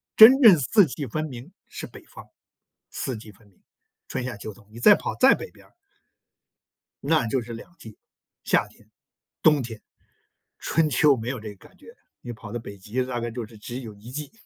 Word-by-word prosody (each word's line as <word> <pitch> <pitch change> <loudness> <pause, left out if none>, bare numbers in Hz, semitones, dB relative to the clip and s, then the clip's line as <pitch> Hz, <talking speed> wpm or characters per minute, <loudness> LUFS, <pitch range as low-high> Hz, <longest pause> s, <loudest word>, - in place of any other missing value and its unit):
真 255 +6 +9
正 200 - +8
四 200 - +4
季 140 +1 -6
分 155 +7 -3
明 125 -4 -10 0.2
是 - - -8
北 - - -14
方， - - -13 0.7
四 130 - -4
季 110 -1 -12
分 105 +2 -23
明， 95 - -30 0.4
春、 130 - -4
夏、 125 - -5
秋、 105 +1 -8
冬。 100 +1 -21
你 115 - -11
再 205 - +8
跑 - - -5
再 265 - +6
北 - - -6
边 - - -20
儿 - - -26 1.3
那 155 -4 +2
就 120 +2 -1
是 115 +1 -9
两 115 +9 -11
季， 110 -8 -12 0.5
夏 - - +2
天、 - - -23 0.5
冬 150 -2 +5
天， 115 -3 -7 0.8
春 165 -2 +1
秋 140 0 +4
没 115 +1 -6
有 130 - -5
这 110 - -8
个 - - -18
感 - - -26
觉。 - - -18 0.3
你 120 - -7
跑 110 -1 -11
到 120 - -3
北 100 -3 -10
极 110 +7 -3
大 125 -1 -4
概 120 - -3
就 120 0 -5
是 110 0 -14
只 120 +4 -7
有 110 -4 -9
一 105 +4 -13
季， 150 +1 -6
120 Hz, 225 characters per minute, -24 LUFS, 110-150 Hz, 1.3 s, 真